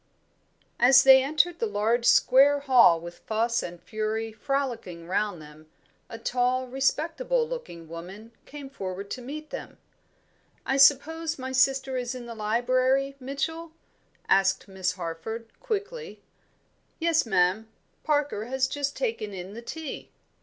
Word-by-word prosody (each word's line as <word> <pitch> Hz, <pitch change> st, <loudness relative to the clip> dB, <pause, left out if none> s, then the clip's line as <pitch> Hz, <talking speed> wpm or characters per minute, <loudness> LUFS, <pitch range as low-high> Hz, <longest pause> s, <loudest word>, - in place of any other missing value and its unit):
As 260 Hz, +2 st, +7 dB
they 265 Hz, 0 st, +8 dB
entered 310 Hz, +5 st, +1 dB
the 460 Hz, -, 0 dB
large 235 Hz, -, 0 dB
square 280 Hz, +2 st, +5 dB
hall 245 Hz, -11 st, +5 dB
with 170 Hz, +1 st, -10 dB
Fuss 230 Hz, +2 st, 0 dB
and 175 Hz, 0 st, -7 dB
Fury 220 Hz, +2 st, -3 dB
frolicking 225 Hz, -8 st, -3 dB
round 200 Hz, 0 st, -1 dB
them, 155 Hz, 0 st, -14 dB, 0.4 s
a 230 Hz, -, -7 dB
tall 250 Hz, +2 st, 0 dB
respectable 330 Hz, -, 0 dB
looking 460 Hz, -, -7 dB
woman 185 Hz, +7 st, -10 dB, 0.2 s
came 290 Hz, -1 st, -9 dB
forward 195 Hz, -6 st, -7 dB
to 255 Hz, -, -5 dB
meet 305 Hz, +5 st, -8 dB
them. -, -, -8 dB, 0.9 s
"I 270 Hz, -, 0 dB
suppose 315 Hz, +4 st, +4 dB
my 260 Hz, 0 st, -5 dB
sister 265 Hz, 0 st, +2 dB
is 250 Hz, 0 st, -3 dB
in 245 Hz, -1 st, -8 dB
the 235 Hz, -, -7 dB
library, 255 Hz, +5 st, +1 dB
Mitchell?" 315 Hz, +5 st, -4 dB, 0.5 s
asked 195 Hz, 0 st, +2 dB
Miss 190 Hz, -2 st, -2 dB
Harford, 180 Hz, +6 st, -6 dB
quickly. 465 Hz, 0 st, -5 dB, 0.7 s
"Yes, 325 Hz, -5 st, +1 dB
ma'am. 190 Hz, +2 st, +2 dB, 0.4 s
Parker 290 Hz, -8 st, 0 dB
has 260 Hz, +2 st, 0 dB
just 285 Hz, +1 st, -3 dB
taken 330 Hz, -, -3 dB
in 185 Hz, +2 st, -8 dB
the 230 Hz, -, -8 dB
tea." 315 Hz, +5 st, -7 dB
255 Hz, 135 wpm, -26 LUFS, 210-280 Hz, 0.9 s, they